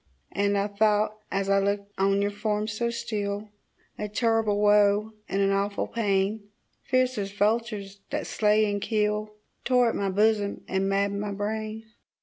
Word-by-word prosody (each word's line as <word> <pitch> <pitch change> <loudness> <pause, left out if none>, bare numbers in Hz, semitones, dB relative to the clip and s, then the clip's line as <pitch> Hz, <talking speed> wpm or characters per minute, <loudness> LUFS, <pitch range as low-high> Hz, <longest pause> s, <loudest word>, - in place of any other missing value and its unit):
And 200 0 +1
I 200 - +1
thought 210 +1 +2 0.2
as 195 0 -1
I 195 0 +4
looked 200 0 -1
on 195 +1 +2
your 205 - 0
form 210 0 -1
so 225 +2 -1
still, 210 -2 -3 0.5
A 210 - -3
terrible 225 -1 +1
woe, 210 +1 +4 0.2
and 195 +1 +1
an 195 - +2
awful 200 +1 0
pain, 205 -1 -1 0.3
Fierce 255 -2 +1
as 195 -1 -3
vultures 205 -1 -1
that - - -2
slay 215 0 +2
and 205 -1 -1
kill, 210 -1 -1 0.3
Tore 250 -2 +3
at - - -3
my 200 -1 -1
bosom 205 +1 +1
and 190 +1 0
maddened 200 +1 0
my 205 -1 -3
brain. 215 +2 -4
205 Hz, 160 wpm, -26 LUFS, 200-215 Hz, 0.5 s, I